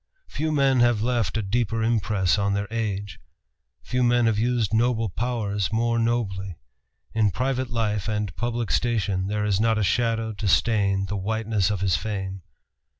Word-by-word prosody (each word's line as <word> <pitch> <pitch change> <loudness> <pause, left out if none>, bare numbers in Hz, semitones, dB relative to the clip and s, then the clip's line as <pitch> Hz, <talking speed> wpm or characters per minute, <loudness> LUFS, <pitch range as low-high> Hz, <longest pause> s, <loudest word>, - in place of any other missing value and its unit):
Few 155 +1 -2
men 135 -3 +3
have 120 -3 +3
left 115 -6 0
a 110 - -1
deeper 115 +2 0
impress 105 -4 +1
on 100 0 +1
their 100 +1 -2
age. 105 -3 -3 0.6
Few 125 +1 -1
men 120 -1 +3
have 110 -2 +2
used 120 -2 0
noble 115 -1 +2
powers 105 -2 -2
more 115 +1 +1
nobly. 100 -6 -1 0.6
In 110 -2 +3
private 130 +5 -1
life 105 -4 -1
and 105 -4 -2
public 120 +4 -2
station 100 -5 0
there 105 +1 -1
is 100 -2 +1
not 110 0 +2
a 110 - +1
shadow 115 +1 0
to 105 0 -4
stain 100 -2 +2
the 105 +1 -3
whiteness 110 -1 0
of 100 -3 -2
his 95 -4 +2
fame. 95 0 -4
110 Hz, 165 wpm, -24 LUFS, 100-120 Hz, 0.6 s, men